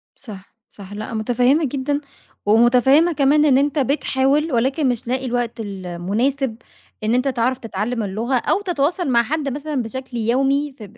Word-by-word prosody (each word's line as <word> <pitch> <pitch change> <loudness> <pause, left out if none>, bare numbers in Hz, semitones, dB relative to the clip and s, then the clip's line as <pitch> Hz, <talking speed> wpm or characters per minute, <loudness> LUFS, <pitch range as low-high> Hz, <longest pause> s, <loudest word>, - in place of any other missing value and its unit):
صح 200 -6 -12
صح، 200 -1 -12
لأ 215 +3 -6
متفهّمة 245 +7 +2
جدًا، 285 +2 -2 0.4
ومتفهّمة 250 +9 +4
كمان 295 +1 +3
إن 270 -3 +4
أنت 290 +2 +1
بتحاول، 280 +2 +1
ولكن 265 +4 +1
مش 240 -1 -3
لاقي 260 +2 -1
الوقت 240 -1 -2
المناسب 205 +7 -2 0.5
إن 215 +2 +1
أنت 250 +2 +1
تعرف 255 0 0
تتعلّم 225 0 -3
اللغة، 220 +6 -2
أو 370 - 0
تتواصل 345 -2 -1
مع 235 -1 +4
حد 285 +1 -2
مثلًا 290 -1 -3
بشكل 250 +2 -6
يومي، 270 +5 0
ف 220 - -10
255 Hz, 155 wpm, -20 LUFS, 230-280 Hz, 0.5 s, ومتفهّمة